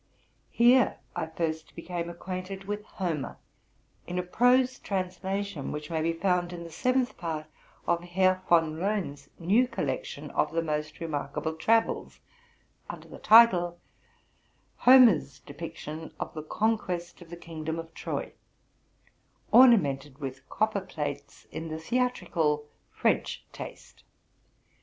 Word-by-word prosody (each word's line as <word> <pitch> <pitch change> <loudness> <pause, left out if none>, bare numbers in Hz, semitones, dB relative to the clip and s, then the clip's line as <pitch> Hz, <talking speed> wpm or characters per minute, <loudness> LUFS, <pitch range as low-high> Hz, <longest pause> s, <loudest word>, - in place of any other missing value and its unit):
Here 245 +1 +4 0.2
I 160 - -2
first 160 -1 -4
became 170 0 -4
acquainted 185 +2 -6
with 205 +1 -4
Homer, 170 -10 -3 0.7
in 180 - -4
a 180 - 0
prose 250 +7 +3
translation, 190 -3 -3
which 150 +2 -6
may 160 -1 0
be 165 +1 +1
found 180 0 0
in 175 -1 -7
the 165 - -10
seventh 255 +5 0
part 160 -3 -4 0.4
of 170 0 +1
Herr 185 +1 +2
Von 165 -2 +4
Loen's 180 -8 -2
new 210 +9 +3
collection - - -4
of - - 0
the 165 0 +1
most 150 -1 -3
remarkable 155 0 -3
travels, 225 +8 +1 0.7
under - - -8
the - - -11
title, 180 -7 +6 0.5
'' - - -40
Homer's 230 - +7
Description 160 +2 -8
of - - -4
the 155 - -5
Conquest 180 -1 -2
of 170 - -13
the 170 - -8
Kingdom 160 -1 -5
of 165 0 -7
Troy, - - -4 0.6
* - - -37
ornamented 145 - +5
with 135 -2 -7
copperplates 180 -10 -3
in 160 - -5
the 155 0 -4
theatrical 165 -8 0 0.2
French - - 0
taste. - - -10
175 Hz, 130 wpm, -28 LUFS, 160-205 Hz, 0.7 s, Homer's